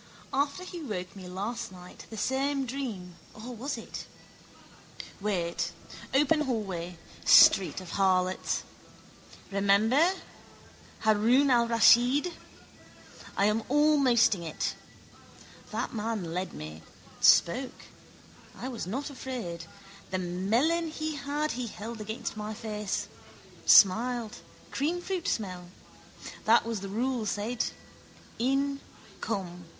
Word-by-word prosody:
After 280 +6 0
he 355 -2 -7
woke 190 - -5
me 185 -2 -9
last 205 +5 -4
night 180 -1 -12
same 270 +5 0
dream 225 -10 -5 0.2
or 240 +3 -8
was 265 +6 -4
it? - - -8 1.1
Wait. 185 -5 -2 0.4
Open 295 +3 +3
hallway. 190 - -3 0.3
Street 190 - +7
of 185 -2 -9
harlots. 185 -1 +1 0.9
Remember. 215 - +3 0.9
Haroun 230 +6 +4
al 235 -1 +4
Raschid. 240 - +5 1.0
I 200 - +3
am 210 +2 +2
almosting 260 - +4
it. 160 -2 -3 1.0
That - - -3
man 210 -6 -3
led 185 +2 -3
me, 75 +1 -8 0.4
spoke. 250 +9 +4 0.7
I 255 - -5
was 235 -8 -5
not 270 +9 -3
afraid. 230 -12 -6 0.4
The 185 - -1
melon 220 - +1
he 310 0 -4
had 290 +2 -2
he 245 0 -3
held 220 +1 -7
against 220 +3 -5
my 215 0 -5
face. 210 -2 -3 0.6
Smiled: 230 +3 +5 0.3
creamfruit 350 +4 -2
smell. 180 -5 -3 0.8
That 225 +2 +5
was 230 -2 -2
the 195 - -6
rule, 235 +2 -1
said. 220 +4 -1 0.7
In. 275 +3 +1 0.4
Come. 180 -5 -4
225 Hz, 105 wpm, -29 LUFS, 195-270 Hz, 1.1 s, Street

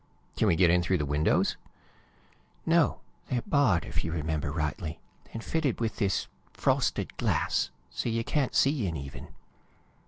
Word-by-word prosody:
"Can - - +2
we 85 - +4
get 85 0 +5
in 90 0 +4
through 90 +2 +1
the 75 - -1
windows?" 75 +2 +2 1.1
"No. 165 -1 +3 0.3
They're 125 -2 -1
barred, 120 - +3
if - - -3
you 80 - -3
remember 80 -2 -2
rightly, 75 +1 -3 0.3
and 115 - -6
fitted 155 -6 0
with 115 -1 -1
this 100 -2 +1 0.3
frosted - - 0
glass, - - +1 0.2
so - - -2
you 115 0 0
can't 140 +1 0
see 135 -7 +3
in, 80 -2 -3
even." 70 -1 -8
90 Hz, 155 wpm, -29 LUFS, 80-125 Hz, 1.1 s, get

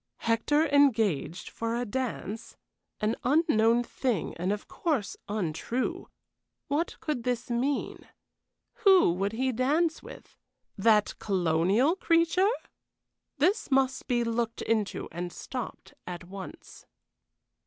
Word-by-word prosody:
Hector 260 +7 +2
engaged 225 - +2
for 230 0 -2
a 245 +1 -1
dance? 230 -2 -4 0.4
An 215 +2 +1
unknown 240 -6 +3
thing, 240 - -2
and 180 +3 -1
of 210 0 -4
course 290 - -1
untrue. 210 +5 -2 0.6
What 300 +5 -1
could 300 -6 -2
this 245 0 -2
mean? 265 +4 -1 0.7
Who 380 - +5
would 195 +4 -1
he 260 +3 0
dance 300 +7 +1
with? - - -12 0.4
That 210 +1 +3
colonial 190 - +2
creature? 335 +2 +3 0.9
This 380 +10 +2
must 265 -1 +1
be 240 -2 +2
looked 230 0 -2
into 215 -3 -1
and 175 +1 -4
stopped 250 +5 -7
at 180 0 -6
once. 190 +1 -10
235 Hz, 110 wpm, -28 LUFS, 205-280 Hz, 0.9 s, Who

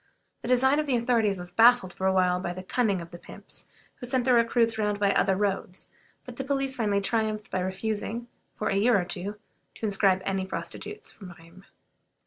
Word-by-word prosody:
The - - -6
design 265 +3 +3
of 305 - -1
the 265 - +2
authorities 230 -4 +1
was 180 0 -6
baffled 230 -5 +5
for 190 - -1
a - - +4
while 180 -1 +2
by 175 -1 -3
the 185 +1 -8
cunning 200 -3 0
of 170 - -10
the 175 - -10
pimps, - - -11 0.3
who 245 - -8
sent 255 -1 +1
their 255 - +4
recruits 230 -1 +2
round 210 -1 0
by 200 -1 +3
other 195 -1 +2
roads; 195 -2 -3 0.4
but 250 -1 -10
the 270 - -3
police 270 -1 -1
finally 205 -5 0
triumphed 215 +1 -1
by 185 - -1
refusing, 215 +5 -3 0.3
for 215 - -2
a - - 0
year 220 +1 +4
or 175 - -2
two, 200 +3 -3 0.4
to - - -5
inscribe 195 -2 +2
any 195 -1 -1
prostitutes 425 - -6
from 180 -4 -12
Rheims. 170 +4 -17
210 Hz, 205 wpm, -27 LUFS, 190-240 Hz, 0.4 s, baffled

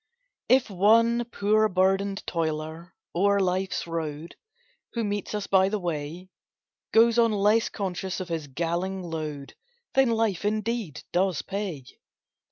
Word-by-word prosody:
If 255 0 +5
one 230 +5 +3
poor 215 -1 +2
burdened 195 +1 +1
toiler 160 +1 -3 0.2
o'er 200 +3 +3
life's 185 0 0
road, 160 -1 -5 0.6
Who 235 - -1
meets 205 0 -3
us 205 -1 -2
by 190 -1 +4
the 215 - -1
way, 170 0 -5 0.6
Goes 230 +1 +5
on 230 -1 +4
less 210 +2 +3
conscious 190 -2 -3
of 185 - -5
his 165 -4 -3
galling 175 +6 -2
load, 155 -4 -5 0.4
Then 265 -2 +4
life, 220 -6 0
indeed, 215 - -2
does 185 -2 +1
pay. 190 -9 -4
190 Hz, 130 wpm, -26 LUFS, 170-215 Hz, 0.6 s, If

